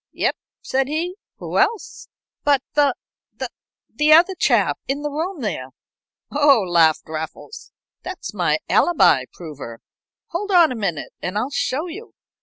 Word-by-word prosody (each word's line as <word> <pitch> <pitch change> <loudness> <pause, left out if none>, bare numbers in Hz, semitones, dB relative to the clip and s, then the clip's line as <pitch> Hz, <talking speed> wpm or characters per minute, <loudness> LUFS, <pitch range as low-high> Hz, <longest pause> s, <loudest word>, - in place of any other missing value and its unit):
"Yep," - - 0 0.3
said 265 0 0
he. 325 +5 -2 0.2
"Who - - -3
else?" 450 -3 -1 0.4
"But 280 -2 +3
the 285 -3 +3 1.0
the 300 0 +2
other 345 +4 +6
chap - - +2
in 280 +2 -2
the 295 - -2
room 325 +2 -3
there?" 165 - -3 0.6
"Oh," 285 -4 +5
laughed 165 -3 +4
Raffles. 160 - -7 0.3
"That's - - -7
my - - +1
alibi 145 - +4
prover 140 -9 -9 0.5
hold 400 +5 -3
on 345 -6 +5
a - - -3
minute 195 -9 -3
and 185 +3 -3
I'll 250 +6 -1
show 280 +2 -1
you." 380 +7 -9
280 Hz, 140 wpm, -21 LUFS, -, 1.0 s, other